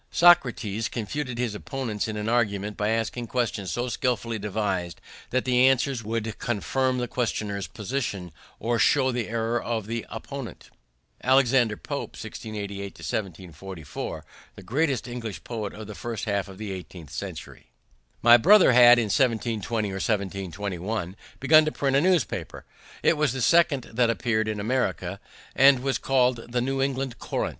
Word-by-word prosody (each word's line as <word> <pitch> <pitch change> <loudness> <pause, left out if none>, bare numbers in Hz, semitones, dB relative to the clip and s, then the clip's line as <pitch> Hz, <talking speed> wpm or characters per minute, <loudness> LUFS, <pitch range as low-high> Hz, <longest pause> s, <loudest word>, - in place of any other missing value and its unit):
Socrates 125 - +3
confuted 125 +3 -4
his 120 -3 -1
opponents 115 -2 -4
in 105 -1 -4
argument 105 -3 0
by 105 +1 -1
asking 115 +2 -1
questions 110 -6 -2
so 120 +1 -2
skillfully 115 -2 -1
devised 95 -5 -2 0.3
that 130 0 0
the 125 0 +4
answers 135 -2 +1
would 110 0 -3
confirm 130 +3 0
the 125 0 -2
questioner's 105 -5 -2
position 105 -6 -4 0.3
or 115 +1 0
show 130 -2 +4
the 120 -3 -3
error 115 +1 -1
of 115 -3 -3
the 115 0 -3
opponent. 120 +2 -8 0.5
Alexander 125 -4 +3
Pope - - -5
(1688 100 -2 -6
1744), 90 -1 -6 0.3
the - - -11
greatest 135 -1 0
English 115 -8 -6
poet 110 -4 -4
of 110 0 -8
the 105 - -8
first 115 +1 -5
half 100 -2 -1
of 95 -1 -11
the 105 -1 -5
eighteenth 90 -4 -9
century. - - -7 0.6
My 120 +1 +9
brother 190 - +6
had, 120 0 +8
in 120 - +2
1720 115 -1 0
or 95 0 -4
1721, 100 -1 -3 0.2
begun 155 +3 +6
to 155 - 0
print 135 -2 0
a 140 - +5
newspaper. 180 -4 0 0.4
It 165 - +4
was 150 -4 +1
the 130 - -4
second 145 +2 +4
that 120 0 +3
appeared 110 -2 0
in 110 -1 -2
America, 100 -5 -1 0.4
and 135 -1 +6
was 135 0 -1
called 130 -2 +2
the 120 - +1
New 135 +2 -1
England 135 -2 -2
Courant. - - -2
115 Hz, 150 wpm, -26 LUFS, 105-130 Hz, 0.6 s, My